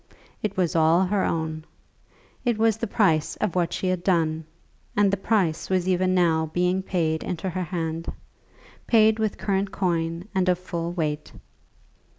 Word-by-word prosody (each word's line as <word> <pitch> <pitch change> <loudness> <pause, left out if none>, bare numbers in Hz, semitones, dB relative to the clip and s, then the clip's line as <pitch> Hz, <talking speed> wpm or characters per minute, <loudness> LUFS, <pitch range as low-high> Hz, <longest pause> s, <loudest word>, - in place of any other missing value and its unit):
It 205 -3 -3
was 175 -3 +1
all 165 +3 +4
her 195 +1 0
own. 160 -1 -2 0.8
It 240 -3 +1
was 220 -1 +3
the 230 - -3
price 165 -8 +2
of 210 -5 -1
what 175 -2 0
she - - -3
had 185 -1 0
done; 160 -4 +1 0.5
and 205 -1 +4
the - - +2
price 190 -5 0
was 185 -1 +1
even 185 0 +2
now 160 -3 +2
being 180 +1 +1
paid 160 -4 -1
into 180 +1 -3
her 185 +1 -2
hand, 165 -1 -3 0.8
paid 220 -1 +4
with 215 -2 -1
current 195 -1 -1
coin 170 -1 -1
and 185 -1 +2
of 180 - +3
full 170 -2 -4
weight. 150 -4 -3
180 Hz, 165 wpm, -25 LUFS, 165-195 Hz, 0.8 s, all